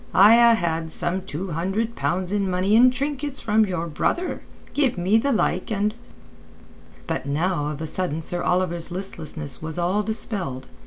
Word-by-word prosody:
I 205 +4 +8
ha' 235 -1 +6
had 165 -3 -2
some 175 +4 -2
two 185 0 -5
hundred 195 +8 -2
pounds 180 +1 -1
in 200 -2 0
money 185 +3 +2
and 250 +2 +7
trinkets 280 +1 -2
from 215 -1 +2
your 180 -3 -2
brother. 345 - -1 0.3
Give 270 -4 +1
me 190 +5 +3
the 280 +4 0
like 185 -6 0
and...." 210 0 0 1.1
But - - -3
now 155 +1 0
of 150 0 -5
a - - -2
sudden 165 -1 -2
Sir 175 +2 -2
Oliver's 175 -2 0
listlessness 160 -6 -4
was 160 +1 -5
all 180 +4 +1
dispelled. 195 - -3
185 Hz, 165 wpm, -23 LUFS, 165-220 Hz, 1.1 s, I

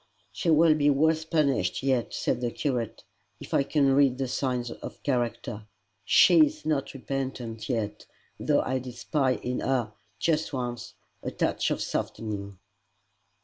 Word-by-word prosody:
"She 175 - -2
will 160 0 +6
be 145 -1 +3
worse 160 +3 +2
punished 150 -5 +1
yet," 130 -3 +1
said 125 - -1
the 120 - 0
curate, 120 -4 -3 0.4
"if - - -9
I - - +4
can 140 -1 +2
read 135 -2 +4
the 135 -1 -1
signs 125 -2 -2
of - - -9
character. 120 -4 -2 0.4
SHE 320 - +7
is 310 +1 -9
not 145 -3 -1
repentant 130 -4 -4
yet 110 -4 -3 0.3
though - - +2
I 130 0 -1
did 125 -1 -8
spy 130 +1 +1
in 125 0 -3
her 120 -5 0 0.2
just 160 -2 0
once 120 -2 -4 0.3
a - - -3
touch - - 0
of - - -1
softening." 100 -3 -4
130 Hz, 150 wpm, -27 LUFS, 120-145 Hz, 0.4 s, SHE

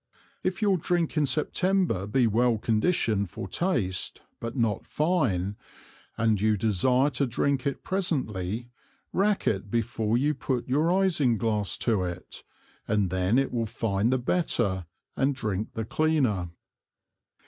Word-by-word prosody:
If 185 +3 -2
your 195 -3 +3
Drink 170 0 0
in 150 -2 +2
September 165 - +1
be 125 +4 +2
well 115 +1 +2
condition'd 110 - +1
for 95 - -6
taste, 100 - -1 0.2
but 115 +2 -5
not 115 -5 0
fine, 120 - 0 0.6
and 110 -3 +2
you 110 0 +3
desire 125 +7 +2
to 140 - 0
drink 140 +3 0
it 140 - -3
presently, 120 - -2 0.4
rack 200 +1 +1
it 100 0 0
before 115 0 0
you 145 +4 +2
put 130 -2 -2
your 150 +6 +2
Ising 165 -11 +2
glass 105 -2 0
to 110 -5 +2
it, 90 0 -5 0.5
and 105 -4 +1
then 95 +5 +2
it 135 0 +1
will 115 -2 0
fine 110 -1 0
the 130 - +2
better 120 - 0 0.3
and 135 +1 +1
drink 105 -3 -3
the 110 - -3
cleaner. 130 - +1
120 Hz, 140 wpm, -27 LUFS, 105-150 Hz, 0.6 s, your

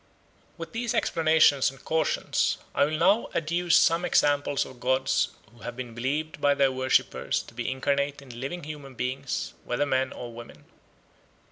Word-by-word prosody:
With 165 -1 -7
these 230 0 -2
explanations 155 -4 +4
and 135 0 -15
cautions 160 0 +1 0.2
I - - +4
will 155 +1 -2
now 195 +7 +3
adduce 170 +2 +1
some 165 +1 +4
examples 145 -4 +2
of 130 - -12
gods 130 +2 +1 0.3
who 120 - -19
have 120 - -6
been 125 -2 -6
believed 145 +7 -3
by 145 0 +4
their 135 -1 +3
worshippers 130 0 +1
to - - -15
be 120 0 -3
incarnate 140 +2 -1
in 125 -4 -10
living 175 +6 -4
human 145 -3 -8
beings, 130 +3 -3
whether 120 +4 0
men 130 -1 0
or 120 -1 -8
women. 120 0 -12
140 Hz, 160 wpm, -27 LUFS, 130-155 Hz, 0.3 s, explanations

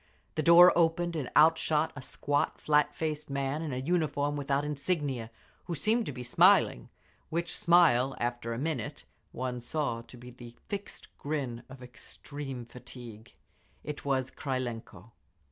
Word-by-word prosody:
The 155 - -1
door 170 +3 +8
opened, 170 0 +2
and 145 -6 -3
out 160 +2 +6
shot 155 0 0
a 140 - -7
squat, 145 +2 -1
flat 150 -1 +2
faced 155 -2 -3
man 140 +2 -2
in 160 -3 -4
a 125 - -3
uniform 145 -1 0
without 140 0 -1
insignia, 145 -5 -2 0.4
who 170 - -3
seemed 220 - +1
to - - -2
be 125 -2 -7
smiling—which 125 - +1
smile, 155 -7 +4
after 120 -1 -2
a 115 - -3
minute, 140 -4 -3 0.3
one 125 -1 -4
saw 120 -2 -2
to 120 +2 -14
be 125 +1 -11
the 120 -1 -12
fixed 200 -1 -6
grin 140 -5 -3
of 130 -1 -11
extreme 130 +1 -8
fatigue. 120 -2 -12 0.5
It 150 -1 -6
was 130 -2 0
Krylenko. 115 - -5
140 Hz, 145 wpm, -30 LUFS, 125-155 Hz, 0.5 s, door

